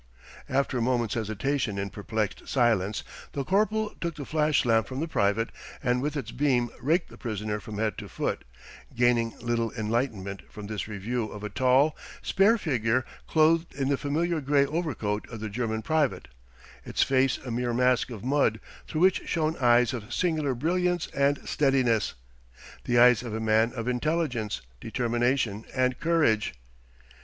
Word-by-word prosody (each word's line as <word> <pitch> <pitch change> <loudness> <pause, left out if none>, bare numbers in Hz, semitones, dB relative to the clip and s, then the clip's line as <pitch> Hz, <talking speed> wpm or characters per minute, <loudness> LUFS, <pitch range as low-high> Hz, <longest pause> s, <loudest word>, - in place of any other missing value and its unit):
After 135 -1 +1
a - - -1
moment's 120 -2 +1
hesitation 110 +1 -1
in 100 0 -3
perplexed 105 0 -3
silence, 110 -6 +1 0.3
the 140 - -2
corporal 210 +6 +1
took 170 -2 -2
the 145 - -6
flash 150 -2 +2
lamp 115 -2 +3
from 130 0 -5
the 160 - -1
private 110 -5 +1 0.3
and 125 0 +1
with 150 +2 -2
its 140 - -4
beam 125 -4 +1
raked 165 +7 +1
the - - -14
prisoner 105 -2 -3
from 105 0 -8
head 110 0 -1
to - - -8
foot, - - -2 0.5
gaining 120 -1 +2
little 115 -1 0
enlightenment 110 -4 -2
from 105 - -8
this 105 0 -4
review 110 +3 -2
of 105 -1 -8
a 105 - -3
tall, 130 +6 +3 0.3
spare 205 +4 +4
figure 125 - 0 0.2
clothed 160 +1 +3
in 135 -1 -1
the 140 - +3
familiar 160 +4 -1
gray 140 0 +3
overcoat 140 -10 -2
of 115 - -7
the 110 0 -4
German 110 0 -2
private 155 -4 0 0.5
its - - +1
face 135 -1 +2
a 125 - -7
mere 120 +1 -1
mask 125 +1 +2
of 115 -4 -8
mud 130 -4 +2 0.3
through 155 - -2
which 185 +1 +4
shone 160 -1 0
eyes 120 0 +4
of 115 -1 -6
singular 155 -4 0
brilliance 175 +5 0
and 140 +1 +1
steadiness, 130 -7 +2 0.7
the 120 - +2
eyes 125 -1 +7
of 115 -3 -5
a - - -2
man 110 +1 +3
of 115 -2 -4
intelligence, 125 -4 -1 0.2
determination, 120 - 0
and 130 -1 +1
courage. 150 - +2
125 Hz, 165 wpm, -27 LUFS, 110-145 Hz, 0.7 s, eyes